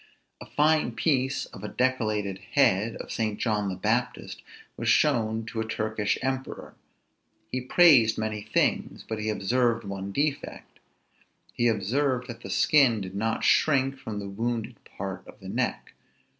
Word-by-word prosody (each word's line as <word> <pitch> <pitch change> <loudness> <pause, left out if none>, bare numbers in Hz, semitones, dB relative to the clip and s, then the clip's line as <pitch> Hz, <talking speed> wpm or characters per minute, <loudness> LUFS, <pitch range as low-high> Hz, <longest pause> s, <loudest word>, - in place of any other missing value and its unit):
A - - -9
fine 150 -4 +2
piece 135 -1 0
of - - -12
a - - -3
decollated 110 -6 -1
head 115 -5 +3
of - - -8
St. 110 -2 -1
John 105 -4 0
the 95 - -3
Baptist 115 +6 -2 0.3
was - - -2
shown 115 -6 +2
to 110 0 -4
a 110 - -4
Turkish 110 -1 -1
emperor: 130 0 -4 0.8
he 130 - -2
praised 130 -6 +5
many 110 -1 -2
things, - - -1
but 110 -1 -4
he 110 0 -2
observed 115 +3 +1
one 100 -1 -5
defect: 145 +5 -3 0.7
he 120 - +1
observed 125 +5 0
that 120 - -8
the 100 - -8
skin 125 +2 +4
did 95 -1 -6
not 110 +3 -1
shrink 135 -3 +3
from 110 -2 -6
the 100 -1 -5
wounded 115 +3 -3 0.2
part 95 -1 -4
of - - -14
the 95 -2 -9
neck. 125 +5 -2
115 Hz, 155 wpm, -27 LUFS, 105-130 Hz, 0.8 s, praised